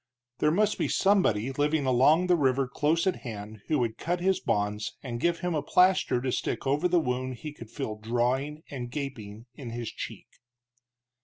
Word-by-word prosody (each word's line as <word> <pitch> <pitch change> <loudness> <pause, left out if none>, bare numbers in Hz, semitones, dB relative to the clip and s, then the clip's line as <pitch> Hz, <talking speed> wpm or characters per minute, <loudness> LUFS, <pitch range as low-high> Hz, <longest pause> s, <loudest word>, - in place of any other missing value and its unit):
There 150 - +3
must 210 +6 +2
be - - +1
somebody 135 - +2
living 145 +1 +1
along 135 +7 +4
the 180 -1 +4
river 135 -3 +2
close 150 +6 +1
at 190 - +1
hand 110 -3 -8
who 155 - +2
would 115 -3 -1
cut 175 +2 -1
his 190 +1 +2
bonds 105 +1 -1
and 120 -3 -4
give 170 +4 0
him 180 -1 -1
a 150 - 0
plaster 180 -3 +3
to 130 +1 -2
stick - - -2
over 145 +6 +2
the 175 0 +3
wound 130 -3 -2
he 150 +5 -7
could 115 -7 -11
feel 115 -4 -4
drawing 125 +7 -1
and 125 -4 -5
gaping 120 -6 -6
in 125 -1 -8
his 120 -1 -5
cheek. - - -7
135 Hz, 185 wpm, -28 LUFS, 120-160 Hz, -, along